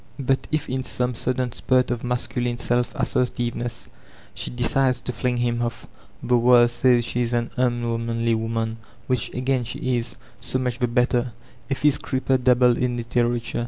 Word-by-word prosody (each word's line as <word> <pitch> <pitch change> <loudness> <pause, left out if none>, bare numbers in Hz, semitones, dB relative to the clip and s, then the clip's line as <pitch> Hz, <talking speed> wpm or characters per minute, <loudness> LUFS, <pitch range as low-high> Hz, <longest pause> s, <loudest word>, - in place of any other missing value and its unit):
But 135 -1 0
if, 155 -2 -1
m 130 +1 -2
some 125 -1 -2
sudden 125 +1 -1
spurt 125 +1 +1
of 120 -1 -2
masculine 120 0 -1
sdf 120 0 +1
assertiveness, 120 - -2 0.5
she - - -4
decides 125 +1 +1
to - - -3
fling 125 +2 -1
him 120 0 0
off, 120 -2 -3 0.4
the 125 0 +3
world 120 0 +6
sMys 120 0 +3
she 120 +1 -1
b 120 0 0
an 120 0 -2
un 120 -2 0
womanly 115 0 0
woman,— 115 0 -2 0.3
which 125 -4 -1
again 130 0 0
she 125 +1 -2
is; 115 0 -6 0.2
so - - -3
modi 125 -2 -2
the 125 - +2
better* 125 0 +1 0.4
Effics 145 +1 +2
creeper 130 0 0
dabbled 125 -1 +4
in 125 -1 0
Itteratore. 120 0 -1
120 Hz, 165 wpm, -23 LUFS, 120-125 Hz, 0.5 s, world